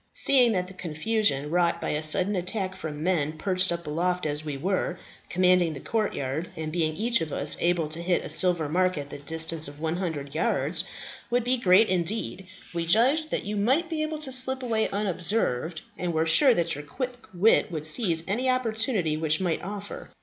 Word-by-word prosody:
Seeing 250 -4 +4
that 180 -2 0
the 185 - -11
confusion 170 -3 -1
wrought 170 -1 +2
by - - -3
a 150 - -1
sudden 180 +6 +2
attack 185 +1 -2
from 150 -1 -6
men 160 -4 0
perched 185 +1 0
up 170 0 -4
aloft 180 +4 -1
as 150 0 -2
we 150 -3 -4
were, 180 +2 -1 0.3
commanding 180 -2 +3
the 140 - -7
courtyard, 160 - -2
and 155 -1 -5
being 155 -2 -1
each 230 +5 +1
of 160 -2 -4
us 145 +1 0
able 170 -2 +1
to 160 +2 0
hit 175 0 0
a - - -6
silver 175 -4 +3
mark 185 +3 +1
at 145 0 -6
the - - -7
distance 160 +1 -1
of 145 +1 -10
100 160 -3 -3
yards, 155 +6 0 0.4
would 245 0 +1
be 250 +2 +1
great 195 +1 +5
indeed, 185 +1 -2 0.3
we 170 -1 -3
judged 265 - +3
that - - -2
you 210 +1 -3
might 265 - +1
be 315 -1 -2
able 310 0 -2
to 300 -3 +1
slip 260 +1 +2
away 225 -3 0
unobserved, 180 - -1 0.2
and 175 -1 -2
were 160 +1 +2
sure 245 - +6
that 170 -1 +1
your 145 - -6
quick 250 - -4 0.2
wit 190 +1 +3
would 155 -2 -4
seize 165 -1 +2
any 240 +7 0
opportunity 225 - 0
which 155 0 +1
might 175 -4 -1
offer. 205 +2 -7
180 Hz, 195 wpm, -26 LUFS, 160-215 Hz, 0.4 s, sure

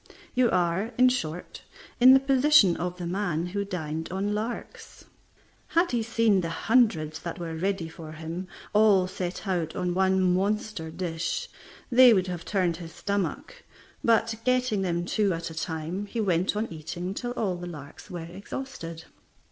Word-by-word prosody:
You 250 -1 +3
are, 180 +6 0
in 255 +1 +6
short, 175 -9 -4 0.4
in 255 +2 +9
the - - +6
position 270 - +5
of 180 0 -3
the 175 - -5
man 175 -2 -1
who 200 +3 -2
dined 160 -5 -4
on 195 +2 -1
larks. 220 +3 -6 0.6
Had 340 +2 +2
he 240 -2 +1
seen 225 -3 +2
the 165 - -3
hundreds 165 -6 +2
that 170 - -6
were 170 -2 -5
ready 185 0 -1
for 160 -1 -10
him, 165 +4 -6 0.3
all 210 -3 +5
set 185 +1 -5
out 170 -4 -1
on 180 -1 -1
one 190 -1 +3
monster 200 -2 -1
dish, 165 0 -3 0.4
they 245 -1 +8
would 185 -2 +2
have 180 -2 -5
turned 180 -5 0
his 165 -2 -10
stomach; 205 - -3 0.4
but 225 0 +3
getting 255 -5 +1
them 175 -2 -1
two 200 +1 +1
at 165 0 -5
a - - -7
time, 165 +4 -4
he 230 - -4
went 185 -2 +1
on 210 -4 -2
eating 175 +4 -5
till 245 +3 -4
all 200 -7 -1
the 175 0 -7
larks 150 -4 -10
were 175 -2 -6
exhausted. 175 -2 -7
185 Hz, 165 wpm, -27 LUFS, 170-220 Hz, 0.6 s, in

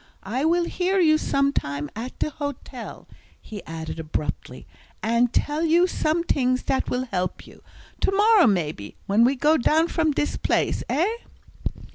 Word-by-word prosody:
I 245 +9 -2
will 345 +2 +3
hear 370 +3 0
you 310 -3 +4
sometime 145 - 0
at 235 +4 -6
de 305 - -1
hotel," 285 -2 -7 0.3
he 210 -2 -9
added 160 0 -6
abruptly, 155 -1 -5 0.4
"and 235 +2 +2
tell 300 +4 0
you 335 +2 +4
some 335 -2 0
tings 255 -5 +1
dat 265 - -1
will 250 +1 -1
help 180 0 -2
you. - - -16 0.4
To - - +1
morrow, 410 -1 +5
maybe, 155 - -1
when 205 +4 +3
we 260 +3 +3
go 300 +4 +3
down 320 +6 +2
from 320 -2 +1
dis 295 +1 -1
place, - - 0
eh?" 310 +9 +2
275 Hz, 155 wpm, -24 LUFS, 215-325 Hz, 0.4 s, morrow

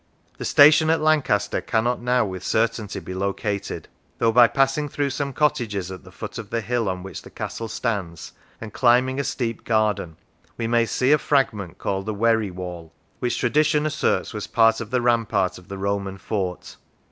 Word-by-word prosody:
The - - -4
station 155 +2 +6
at 160 - +3
Lancaster 155 -9 +1
cannot 120 +2 0
now 125 0 +2
with 95 -2 -6
certainty 110 -2 -1
be 95 - -8
located, 100 +1 -3 0.3
though 115 - +2
by 120 +1 +7
passing 135 +4 +1
through 140 0 -1
some 140 +1 -3
cottages 110 - 0
at 95 - -9
the - - -14
foot - - -7
of - - -8
the 115 - -1
hill 115 -1 -1
on 90 -1 -4
which 95 - -7
the - - -13
castle 115 - -5
stands, 100 -9 -3 0.3
and 110 -2 -8
climbing 130 +2 +3
a - - 0
steep 120 -4 -3
garden, 105 -7 0 0.4
we 115 - -2
may 115 0 +2
see 130 +4 +1
a 150 - +5
fragment 110 - 0
called 95 +1 -3
the 110 - -2
"Wery 110 -1 +2
wall," 90 -3 -8 0.3
which 125 -1 -1
tradition 150 +4 +2
asserts 150 -5 0
was 105 -1 -5
part 115 0 +3
of 110 - -6
the 125 +1 0
rampart 115 -6 +1
of 90 - -19
the 100 - -7
Roman 100 0 -2
fort. 95 -3 -4
115 Hz, 185 wpm, -23 LUFS, 100-125 Hz, 0.4 s, by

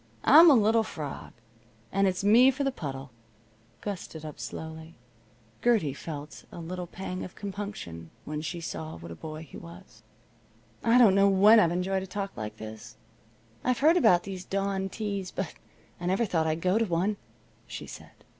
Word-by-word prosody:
I'm 325 +4 +9
a 285 - +7
little 225 0 +4
frog, 155 -9 -6 0.6
and 195 0 +2
it's 185 0 -1
me 230 +6 +7
for 270 +2 -1
the 275 - +1
puddle." 135 - -6 0.7
Gus 200 -3 -4
stood 160 -1 -10
up 150 - -8
slowly. 160 0 -7 0.7
Gertie 220 - +3
felt 150 0 -8
a - - -10
little 175 +1 -5
pang 185 +1 -6
of 185 - -9
compunction 200 - -6 0.2
when 150 0 -4
she 160 +2 -5
saw 160 -1 -6
what 85 0 -10
a - - -7
boy 155 - -8
he 155 - -12
was. 170 +3 -13 0.8
"I 230 +1 +5
don't 230 -6 +7
know 200 +1 +5
when 205 +4 +7
I've 170 -6 +4
enjoyed 185 +2 -1
a 190 - -7
talk 195 +1 -5
like 110 0 -6
this. 110 0 -10 0.7
I've 250 -1 +1
heard 315 +6 +5
about 180 - +5
these 190 -2 -6
dawn 195 0 -2
teas, 200 -2 -4
but 190 -2 -4 0.5
I 175 - -4
never 195 +6 +2
thought 165 -5 0
I'd 160 +1 -1
go 185 +5 +2
to 230 - +2
one," 190 +3 0 0.5
she - - -7
said. - - -13
185 Hz, 180 wpm, -28 LUFS, 160-205 Hz, 0.8 s, I'm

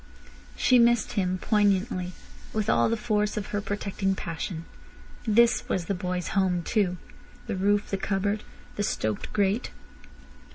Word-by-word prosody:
She 250 -1 +4
missed 235 -1 +4
him 185 -3 0
poignantly, 195 -2 +1 0.4
with 215 -1 +1
all - - +3
the 230 - 0
force 210 -2 0
of 210 - -2
her 205 - 0
protecting 200 -1 -1
passion. 165 -1 -5 0.6
This 230 +2 +4
was 175 - 0
the 200 - -1
boy's 180 -1 -3
home 185 -3 +1
too—the 185 -2 -3
roof, 205 +2 +1
the 195 - +1
cupboard, 200 +2 -1 0.4
the 205 - 0
stoked 110 - -2
grate. 205 +2 +1
200 Hz, 135 wpm, -27 LUFS, 185-210 Hz, 0.6 s, She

